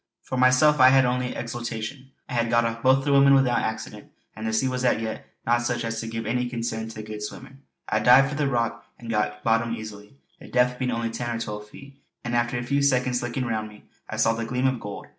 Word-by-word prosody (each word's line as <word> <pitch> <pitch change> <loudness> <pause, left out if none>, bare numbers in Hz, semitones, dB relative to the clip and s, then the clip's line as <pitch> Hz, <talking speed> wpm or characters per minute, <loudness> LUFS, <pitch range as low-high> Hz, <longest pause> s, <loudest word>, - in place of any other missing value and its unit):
For - - -5
myself 130 +4 +4
I 130 0 +8
had 130 0 +5
only 125 0 -1
exultation. 120 +2 -5 0.2
I - - -7
had 115 -1 +1
got 120 0 +3
off 115 0 -3
both 130 +2 +3
the 145 - +1
women 140 0 +6
without 125 -3 +3
accident, 110 0 -5 0.3
and 110 +2 -5
the - - 0
sea 110 +4 +1
was 130 0 -2
as 125 - +2
yet, 110 -1 -5 0.2
not 120 +1 +2
such 120 -1 -2
as 115 0 -3
to 115 - -6
give 115 0 -4
any 125 +2 -1
concern 115 -2 -3
to 110 -1 -8
a - - -10
good 105 0 -7
swimmer. 130 +5 -8 0.3
I - - +1
dived 135 +2 +6
from 140 - -5
the 145 - +2
rock 120 -3 -1
and 115 -1 -7
got 105 -1 -1
bottom 115 0 +1
easily, 105 +1 -10 0.2
the - - -12
depth 125 0 +1
being 130 -1 -1
only 115 -1 -2
ten 120 +1 -3
or - - -3
twelve 105 -2 -6
feet; 140 +4 -14 0.2
and 120 0 -2
after 120 +1 0
a 120 - -3
few 140 +3 0
seconds 125 -2 +2
looking 120 +1 -3
round 110 -2 -2
me 105 0 -16 0.3
I - - -4
saw 115 +1 +3
the 115 0 -3
gleam 125 +3 -2
of 130 -2 +1
gold. 105 -2 -7
120 Hz, 250 wpm, -25 LUFS, 115-130 Hz, 0.3 s, I